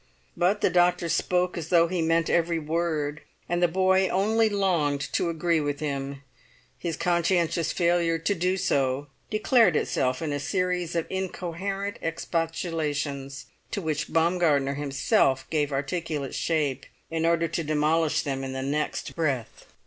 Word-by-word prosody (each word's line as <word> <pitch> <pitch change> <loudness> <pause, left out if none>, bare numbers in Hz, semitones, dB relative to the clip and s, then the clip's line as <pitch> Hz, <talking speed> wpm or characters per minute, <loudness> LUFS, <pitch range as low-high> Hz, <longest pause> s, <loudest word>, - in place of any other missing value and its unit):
But 185 +4 +1
the - - +3
doctor 175 -1 +3
spoke 180 +2 +1
as 160 -1 -7
though 170 -2 +5
he 180 0 -1
meant 165 0 +2
every 170 0 +2
word, 155 -2 -2 0.3
and 175 0 -1
the 175 - +5
boy 190 +2 +3
only 220 +5 +2
longed 170 -9 +1
to 170 - +1
agree 165 0 +1
with 145 -1 -2
him: 140 -2 -4 0.6
his 165 +3 -3
conscientious 170 -1 +1
failure 170 -1 +2
to 165 +5 0
do 185 +1 0
so 140 -4 0 0.2
declared 215 - +4
itself 130 -3 0
in 150 -2 -2
a 145 - -2
series 180 +2 -1
of 165 - 0
incoherent 190 +2 -3
expostulations 160 -4 -2 0.2
to 205 - -3
which 155 -5 -2
Baumgartner 160 -4 +2
himself 135 -2 +1
gave 150 -2 +1
articulate 145 0 -3
shape 145 -5 -1 0.2
in 165 0 -1
order 165 0 +2
to 165 - -2
demolish 155 +1 +1
them 135 -2 -3
in 135 0 -4
the 130 0 -3
next 150 +3 -2
breath. 140 -9 -2
165 Hz, 150 wpm, -26 LUFS, 145-175 Hz, 0.6 s, though